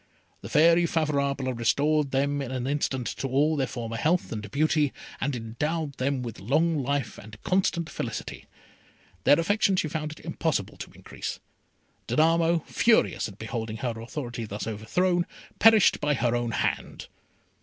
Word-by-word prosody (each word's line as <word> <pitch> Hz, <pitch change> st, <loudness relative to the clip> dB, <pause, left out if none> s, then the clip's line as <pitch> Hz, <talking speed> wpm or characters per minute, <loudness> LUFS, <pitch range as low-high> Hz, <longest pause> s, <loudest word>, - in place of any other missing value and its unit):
The -, -, -8 dB
Fairy 170 Hz, +2 st, +5 dB
Favourable 140 Hz, -5 st, 0 dB
restored 145 Hz, +5 st, +1 dB
them 140 Hz, +2 st, 0 dB
in 135 Hz, -, -4 dB
an 130 Hz, -1 st, -3 dB
instant 135 Hz, -2 st, -1 dB
to 135 Hz, -, -2 dB
all 145 Hz, +4 st, +2 dB
their 135 Hz, -3 st, 0 dB
former 115 Hz, -2 st, -5 dB
health 165 Hz, +9 st, +1 dB
and 105 Hz, -2 st, -5 dB
beauty, 150 Hz, -, +1 dB, 0.3 s
and 140 Hz, 0 st, -1 dB
endowed 145 Hz, +7 st, -3 dB
them 130 Hz, 0 st, -1 dB
with 115 Hz, -3 st, -6 dB
long 150 Hz, -, +1 dB
life 135 Hz, -4 st, -2 dB
and 110 Hz, +1 st, -12 dB
constant 185 Hz, -3 st, +1 dB
felicity. -, -, -5 dB, 0.8 s
Their 145 Hz, -, +6 dB
affection 200 Hz, +3 st, +2 dB
she 170 Hz, -, 0 dB
found 155 Hz, 0 st, -3 dB
it -, -, -15 dB
impossible 160 Hz, -, -2 dB
to -, -, -8 dB
increase. -, -, -7 dB, 0.7 s
Danamo, 165 Hz, +1 st, +3 dB
furious 230 Hz, -1 st, +2 dB
at 100 Hz, -3 st, -12 dB
beholding 110 Hz, 0 st, -4 dB
her 120 Hz, -, 0 dB
authority 120 Hz, -2 st, -5 dB
thus 105 Hz, 0 st, -5 dB
overthrown, 175 Hz, -, 0 dB, 0.3 s
perished 220 Hz, -3 st, +6 dB
by 150 Hz, 0 st, +2 dB
her 120 Hz, -1 st, +1 dB
own 120 Hz, -1 st, -1 dB
hand. 110 Hz, -, -2 dB
140 Hz, 155 wpm, -27 LUFS, 120-160 Hz, 0.8 s, Their